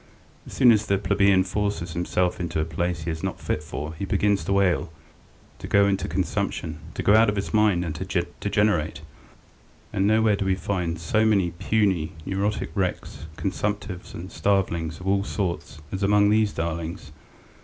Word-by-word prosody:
As - - -10
soon 125 - +6
as 110 -2 +2
the 100 - +2
plebeian 100 -1 +3
forces 95 -3 -2
himself 90 +1 0
into 85 -2 -2
a 80 - +1
place 85 0 -2
he 85 - -2
is 80 0 -5
not - - -3
fit 75 - -2
for 75 +1 -6
he 80 - -7
begins 100 +1 +1
to 100 0 +2
ail, 90 -3 +1 0.7
to - - -7
go 100 0 +4
into 95 -1 0
consumption, 80 -2 -2 0.2
to - - -3
go 100 - +5
out 110 0 +6
of 105 - -1
his 100 +2 -3
mind, 105 -5 +3
and 80 - -3
to 80 - -2
degenerate, 85 -8 +1 0.9
and 95 +1 +2
nowhere 110 -1 +4
do 100 - -2
we 95 -1 +2
find 90 -4 -2
so 95 +7 +1
many 100 -5 +3
puny, 95 -2 0
neurotic 100 +2 -1
wrecks, 90 -4 -3
consumptives, 100 -1 -3
and 90 +3 -8
starvelings 85 -5 0
of 90 - -10
all 100 0 +2
sorts 90 -6 -4
as 95 - -4
among 100 +1 +4
these 110 -1 +3
darlings. 85 -1 -4
95 Hz, 175 wpm, -25 LUFS, 85-100 Hz, 0.9 s, soon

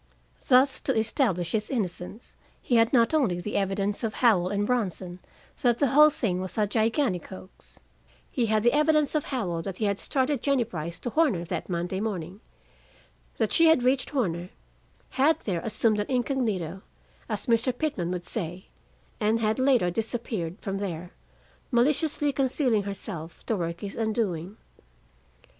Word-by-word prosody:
Thus, 260 +1 +5
to 265 - -1
establish 215 - 0
his 215 -1 0
innocence, 205 -2 -4 0.2
he 240 - +1
had 225 0 +4
not 235 +1 +4
only 235 - +2
the 210 +4 -5
evidence 195 +1 -1
of 220 -1 -2
Howell 195 -8 +3
and 205 +1 0
Bronson 185 -6 -2 0.4
that 240 -2 +3
the 280 -1 +2
whole 300 +4 +7
thing 190 -11 -2
was 185 +3 -6
a 210 - +3
gigantic 220 - 0
hoax; 185 0 -12 0.5
he 240 -3 0
had 215 0 +2
the 240 - +4
evidence 300 -1 +3
of 305 -2 0
Howell 185 -11 -2
that 185 +2 -6
he 215 - -1
had 200 -1 0
started 270 -1 0
Jennie 275 -3 +2
Brice 170 -6 -6
to 245 - -3
Horner 255 - +2
that 175 - -4
Monday 175 +2 -2
morning, 195 -2 -4 1.0
that - - 0
she 330 -1 +6
had 320 -6 +5
reached 255 +1 +2
Horner, 180 - -1 0.6
had 300 +4 +3
there 180 -5 -2
assumed 215 0 +1
an 205 - -2
incognito, 225 - -1 0.5
as - - -3
Mr. 235 +1 +2
Pitman 245 - -2
would 180 -1 -4
say, 180 -3 -5 0.5
and 220 +1 +2
had 220 +2 0
later 255 -9 +3
disappeared 215 -4 -3
from 195 -2 -3
there, 175 -3 -5 0.6
maliciously 290 +3 +1
concealing 260 -4 +1
herself 195 -4 -7
to 225 - 0
work 170 -2 -3
his 200 -1 -6
undoing. 215 -4 -2
220 Hz, 160 wpm, -27 LUFS, 185-255 Hz, 1.0 s, whole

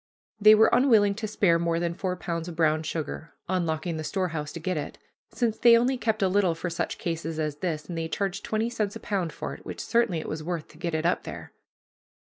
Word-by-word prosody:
They 215 +1 +8
were 220 +1 +5
unwilling 220 -6 +5
to 215 +2 -4
spare 190 -5 +3
more 170 0 0
than 170 0 -1
four 180 +1 -2
pounds 170 -2 -4
of 175 - -6
brown 155 -1 +2
sugar, 160 0 -5
unlocking 170 -2 -1
the 155 - -4
storehouse 160 -5 -2
to 170 - -6
get 185 +3 -2
it, 150 - -4 0.3
since 230 -3 -1
they 235 -1 +7
only 250 +3 +2
kept 220 -4 0
a - - +4
little 185 -3 +2
for 175 +2 -4
such 165 - -2
cases 165 -1 -3
as 150 -2 -2
this, 155 -2 -3
and 175 - -5
they 165 0 -2
charged 195 +3 -2
twenty 220 +2 -1
cents 210 -4 -2
a - - -6
pound 185 -5 -2
for - - -5
it, - - -11
which - - -7
certainly 230 -7 +1
it 160 - -5
was 155 +1 -4
worth 165 -1 -4
to 155 - -17
get 170 -1 -2
it 160 +1 -1
up 175 - +2
there. - - -8
175 Hz, 235 wpm, -27 LUFS, 160-205 Hz, 0.3 s, They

